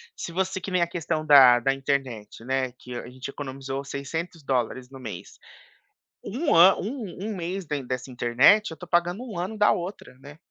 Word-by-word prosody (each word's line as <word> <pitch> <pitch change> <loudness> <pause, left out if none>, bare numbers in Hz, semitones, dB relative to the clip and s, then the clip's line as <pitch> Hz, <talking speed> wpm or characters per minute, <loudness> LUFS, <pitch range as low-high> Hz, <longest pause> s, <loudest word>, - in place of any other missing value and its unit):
se - - -6
você 190 +2 -2
que 195 - -5
nem 180 -1 +2
a - - 0
questão 165 -2 -3
da 130 -5 +8
da 135 +3 +1
internet, 135 -6 -3
né. 130 0 -1
Que 125 0 -10
a 120 - -6
gente 130 +2 -8
economizou 135 -1 -6
$600 140 -4 -3
no 135 -1 -11
mês, 105 -8 -9 0.8
um 275 - -1
an 180 +4 +8
um 210 -4 -5
um 220 - -4
mês 180 +1 -4
da 150 - -3
dessa 130 0 -5
internet, 125 - +4
eu - - -7
estou 175 +3 -12
pagando 175 +6 +1
1 225 -8 -7
ano 190 +5 -4
da 210 0 +5
outra, 175 -6 -5
né. 145 +2 -13
145 Hz, 190 wpm, -25 LUFS, 130-180 Hz, 0.8 s, da